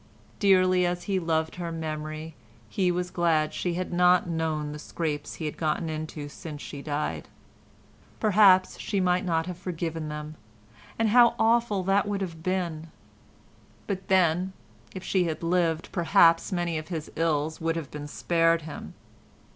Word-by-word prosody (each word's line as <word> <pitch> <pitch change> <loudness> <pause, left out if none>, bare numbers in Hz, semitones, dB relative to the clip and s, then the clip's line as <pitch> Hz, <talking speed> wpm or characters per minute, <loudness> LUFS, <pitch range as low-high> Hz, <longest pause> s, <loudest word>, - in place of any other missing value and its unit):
Dearly 185 -2 +4
as 175 0 -1
he 195 -2 0
loved 160 -1 -1
her 170 -2 -4
memory, 155 0 -5 0.3
he 180 - +1
was 180 0 -2
glad 160 -3 +1
she 175 -2 -2
had 185 0 -3
not 180 0 +4
known 160 -3 -2
the 150 - -7
scrapes 150 -2 -4
he 160 - -5
had 150 - -4
got 155 -2 0
into 155 -2 -5
since 150 0 -8
she 140 - -7
died; 150 0 -3 0.9
perhaps 200 -3 +5
she 200 - -1
might 180 -1 +2
not 165 -3 0
have 180 -1 -6
forgiven 165 -3 -4
them—and 115 - -6
how 240 +1 +6
awful 225 -3 +2
that 195 +2 +2
would 200 -1 -2
have 165 -4 -5
been! 170 -3 -2 1.0
But 195 -2 -4
then, 185 0 +2 0.4
if 185 - -6
she 190 -1 +1
had 160 0 -3
lived, 165 -1 0
perhaps 165 0 +4
many 175 -3 -1
of 155 - -9
his 160 -4 -5
ills 155 -1 0
would 165 0 0
have 165 -5 -5
been 145 0 -6
spared 165 +1 +1
him. 155 -1 -8
165 Hz, 155 wpm, -27 LUFS, 155-185 Hz, 1.0 s, how